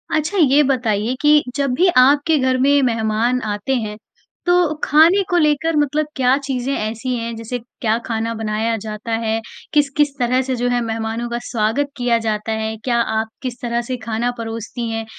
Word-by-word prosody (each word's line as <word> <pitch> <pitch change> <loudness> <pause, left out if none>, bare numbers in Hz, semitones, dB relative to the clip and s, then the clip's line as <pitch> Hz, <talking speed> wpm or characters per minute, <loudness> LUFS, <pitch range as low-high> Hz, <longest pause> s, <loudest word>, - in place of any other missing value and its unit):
अच्छा 315 +6 -1
ये 295 -4 +5
बताइए 235 -4 0
कि 295 0 +5
जब 280 -2 0
भी 365 +7 +3
आपके 290 +5 +5
घर 260 -1 +1
में 285 +1 +4
मेहमान 230 +1 +1
आते 205 +6 -2
हैं 210 0 -6 0.5
तो 355 -3 +3
खाने 330 +7 +5
को 355 - +2
लेकर 310 0 +2
मतलब 295 +1 +1
क्या 260 0 +3
चीज़ें 265 0 -2
ऐसी 230 +3 -3
हैं 230 0 -4
जैसे 230 +2 -5
क्या 230 -1 -2
खाना 225 0 -2
बनाया 220 +1 -1
जाता 215 +2 -6
है? 220 0 0 0.3
किस-किस 290 -1 +2
तरह 250 +1 +2
से 260 0 -2
जो 245 0 -1
है 245 0 +1
मेहमानों 225 +1 -3
का 235 0 -3
स्वागत 235 +5 0
किया 245 -2 +2
जाता 215 0 -2
है? 220 0 -2
क्या 235 +2 -1 0.2
आप 220 - -2
किस 250 -2 -5
तरह 235 -1 -1
से 255 - -1
खाना 230 +2 0
परोसती 230 +1 -5
हैं 225 0 -3
245 Hz, 180 wpm, -19 LUFS, 225-280 Hz, 0.5 s, ये